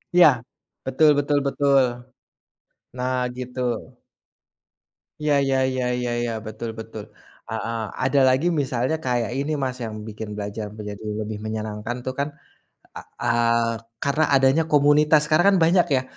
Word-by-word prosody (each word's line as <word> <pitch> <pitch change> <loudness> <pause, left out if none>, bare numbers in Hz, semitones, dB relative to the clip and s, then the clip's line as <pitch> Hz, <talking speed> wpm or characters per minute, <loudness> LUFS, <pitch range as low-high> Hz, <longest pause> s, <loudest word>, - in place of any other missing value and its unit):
Iya, 180 -2 +9 0.6
betul 135 +4 +4
betul 145 0 +1
betul. 140 -1 +3 1.1
Nah 125 +1 -1 0.2
gitu. 125 0 -6 1.6
Ya 150 -1 +2
ya 135 -1 +2
ya 130 -1 -1
ya 125 0 -2
ya, 120 -1 -2
betul 110 +1 -6
betul, 110 -1 -9 0.4
heeh, 115 0 -3 0.2
ada 135 +2 +3
lagi 130 +5 +3
misalnya 140 -4 0
kayak 120 -1 -1
ini, 145 +2 -1
Mas, 130 -2 -2
yang 110 -2 -5
bikin 105 0 -7
belajar 105 0 -5
menjadi 105 -1 -8 0.2
lebih 105 0 -4
menyenangkan 110 +2 -4
tuh 130 - -2
kan, 140 +2 -1 0.7
eee, 115 0 0 0.3
karena 140 +3 +2
adanya 135 +4 +4
komunitas. 150 +1 +4
Sekarang 175 +6 +4
kan - - +2
banyak 175 +2 +4
ya, 130 - +1
130 Hz, 135 wpm, -23 LUFS, 115-145 Hz, 1.6 s, Iya